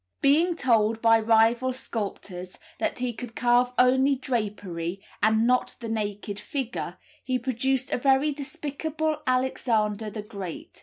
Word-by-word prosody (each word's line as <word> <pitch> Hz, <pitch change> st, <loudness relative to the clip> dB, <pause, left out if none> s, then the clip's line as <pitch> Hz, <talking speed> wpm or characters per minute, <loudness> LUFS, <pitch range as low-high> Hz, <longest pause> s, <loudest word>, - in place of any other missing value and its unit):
Being 325 Hz, +5 st, +4 dB
told 225 Hz, -6 st, +2 dB
by 225 Hz, 0 st, +5 dB
rival 230 Hz, +3 st, +3 dB
sculptors 195 Hz, -7 st, -5 dB, 0.2 s
that -, -, -1 dB
he 250 Hz, -1 st, -1 dB
could 230 Hz, 0 st, -8 dB
carve 245 Hz, 0 st, +3 dB
only 260 Hz, +2 st, +4 dB
drapery, 200 Hz, -8 st, -3 dB, 0.2 s
and 220 Hz, +1 st, +4 dB
not 250 Hz, +1 st, +2 dB
the 230 Hz, -2 st, -6 dB
naked 205 Hz, -2 st, -3 dB
figure, 205 Hz, -, -4 dB, 0.3 s
he 255 Hz, 0 st, 0 dB
produced 260 Hz, +2 st, -1 dB
a -, -, 0 dB
very 270 Hz, +3 st, +3 dB
despicable 310 Hz, +1 st, -3 dB
Alexander 225 Hz, -4 st, +1 dB
the 210 Hz, 0 st, -6 dB
Great. 200 Hz, -5 st, -8 dB
240 Hz, 135 wpm, -26 LUFS, 210-265 Hz, 0.3 s, by